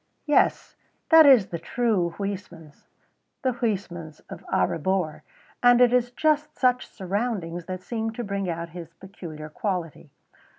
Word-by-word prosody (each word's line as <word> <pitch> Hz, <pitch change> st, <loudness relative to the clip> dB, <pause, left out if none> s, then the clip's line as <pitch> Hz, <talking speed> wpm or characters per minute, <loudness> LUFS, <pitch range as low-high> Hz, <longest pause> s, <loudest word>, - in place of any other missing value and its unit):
Yes, 295 Hz, -2 st, +2 dB, 0.3 s
that 320 Hz, -2 st, +8 dB
is 245 Hz, -8 st, +6 dB
the 170 Hz, -, -4 dB
true 185 Hz, -4 st, 0 dB
Huysmans, 185 Hz, -6 st, -7 dB, 0.6 s
the 260 Hz, -1 st, +1 dB
Huysmans 185 Hz, -9 st, -4 dB
of -, -, -9 dB
A -, -, +3 dB
Rebours, 180 Hz, -1 st, -1 dB, 0.4 s
and 245 Hz, 0 st, +6 dB
it 245 Hz, -1 st, +5 dB
is 245 Hz, -1 st, +2 dB
just 300 Hz, +4 st, 0 dB
such 250 Hz, -1 st, +2 dB
surroundings 190 Hz, -4 st, -3 dB
that 185 Hz, 0 st, -6 dB
seem 225 Hz, +1 st, -3 dB
to 240 Hz, -, -5 dB
bring 200 Hz, -3 st, -3 dB
out 170 Hz, 0 st, -4 dB
his 165 Hz, 0 st, -10 dB
peculiar 165 Hz, -6 st, -9 dB
quality. 180 Hz, -, -4 dB
195 Hz, 140 wpm, -25 LUFS, 170-245 Hz, 0.6 s, that